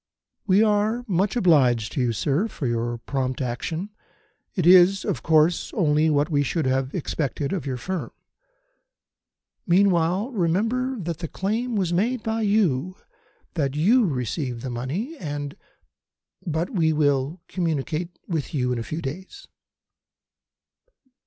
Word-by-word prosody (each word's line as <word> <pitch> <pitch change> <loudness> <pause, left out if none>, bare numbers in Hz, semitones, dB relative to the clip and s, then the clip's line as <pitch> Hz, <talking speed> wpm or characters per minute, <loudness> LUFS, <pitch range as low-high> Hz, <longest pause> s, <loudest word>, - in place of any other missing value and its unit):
"We 195 +2 +5
are 215 +3 +1
much 195 +2 +1
obliged 130 - +3
to 135 - -1
you, 120 -1 +1
sir, 145 - 0
for 160 - -6
your 120 0 -1
prompt 130 +1 -3
action. 160 - -3 0.6
It 180 -6 0
is, 185 +2 +6
of - - -2
course, 160 +1 +3
only 155 -4 +3
what 145 0 +2
we 145 -2 +3
should 155 +2 -1
have 130 +1 0
expected 145 -3 -2
of 175 -7 -3
your 130 -2 -2
firm. 185 +8 -4 1.6
Meantime, 185 +4 +2
remember 225 +8 0
that 170 -2 -4
the 170 - -4
claim 225 +8 -2
was 185 -4 0
made 225 +7 0
by 225 0 -1
you, 185 -6 +1 0.6
that 140 -5 -1
you 215 +9 +4
received 125 -3 -3
the 130 - -4
money, 160 - -4
and 145 -3 -5 0.9
but 165 - -1
we 165 -8 +2
will 145 +1 +1
communicate 165 0 -2
with 160 -2 -3
you 125 -2 0
in 125 - -1
a - - -3
few 155 +7 -5
days." 190 - -7
165 Hz, 140 wpm, -24 LUFS, 140-195 Hz, 1.6 s, is